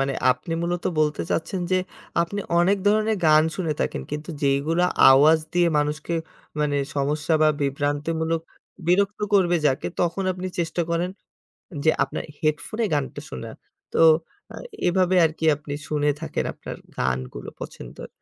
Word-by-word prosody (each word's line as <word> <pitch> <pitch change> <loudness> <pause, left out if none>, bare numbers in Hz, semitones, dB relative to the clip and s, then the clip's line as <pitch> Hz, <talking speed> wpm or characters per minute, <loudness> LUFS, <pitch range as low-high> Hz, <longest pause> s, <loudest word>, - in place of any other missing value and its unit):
মানে 135 0 0 0.2
আপনি 165 +6 -8
মূলত 175 0 -2 0.2
বলতে 150 -1 +1
চাচ্ছেন 180 +3 -1
যে, 185 - +3 0.4
আপনি 200 +4 -4 0.2
অনেক 195 +4 +3
ধরনের 215 +1 +2
গান 155 0 +6
শুনে 165 -5 -1
থাকেন - - -1
কিন্তু 150 +3 -5
যেইগুলো 140 +5 +2 0.3
আওয়াজ 150 +4 +6
দিয়ে 175 -1 +3
মানুষকে 150 +3 -1 0.5
মানে, 145 -1 +1 0.2
সমস্যা 150 +3 0
বা 155 - +6
বিভ্রান্তিমূলক 150 +4 -1 0.5
বিরক্ত 200 +4 +2
করবে 175 -3 +4
যাকে 135 -2 0
তখন 175 +2 0
আপনি 185 +1 -5
চেষ্টা 170 0 0
করেন 170 +2 0 0.7
যে, 160 - +6
আপনার - - -3 0.2
হেডফোনে 160 +9 -1
গানটা 145 -2 -2
শোনার। 65 - -7 0.4
তো - - +1 0.5
আ - - -7 0.3
এভাবে 185 +1 +2
আরকি 160 0 -1
আপনি 150 0 -9 0.2
শুনে 150 -1 +1
থাকেন 160 -2 -2
আপনার - - -8 0.2
গানগুলো 65 -1 -3
পছন্দের। - - -9
160 Hz, 140 wpm, -24 LUFS, 145-175 Hz, 0.7 s, গান